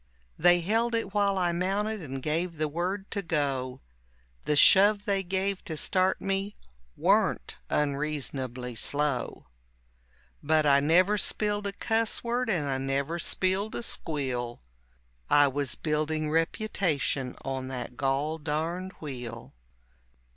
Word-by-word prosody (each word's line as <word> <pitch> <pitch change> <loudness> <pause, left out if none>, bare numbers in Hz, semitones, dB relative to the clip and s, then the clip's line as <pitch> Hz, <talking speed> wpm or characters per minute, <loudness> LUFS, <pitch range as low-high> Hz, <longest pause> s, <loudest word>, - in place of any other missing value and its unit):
They 175 0 +5
held 225 +6 +1
it 215 -4 -2
while 200 -2 +2
I 175 -2 +2
mounted 195 +4 -1
and 135 -4 -6
gave 165 +2 -1
the 155 0 0
word 185 +6 -3
to 200 - -1
go; 140 -7 -2 0.6
The 150 - +1
shove 205 +6 +6
they 200 -1 +1
gave 190 +1 -1
to 160 -3 -4
start 185 +3 +2
me 195 +1 -2 0.4
warn't - - +1
unreasonably 140 -4 -2
slow. 145 +3 -1 1.0
But 155 0 +2
I 140 -1 +6
never 180 +8 +3
spilled 205 0 -1
a - - -2
cuss 225 +2 0
word 240 +1 -1
and 165 -8 0
I 135 -1 -1
never 140 +5 -1
spilled 190 +5 0
a - - -3
squeal 130 - -3 0.7
I 145 0 +6
was 140 -1 -1
building 155 0 -1
reputation 160 - 0
on 130 -1 -3
that 125 -2 -6
gol 140 +4 -1
darned 165 +5 -3
wheel. 120 -6 -8
160 Hz, 130 wpm, -28 LUFS, 140-195 Hz, 1.0 s, shove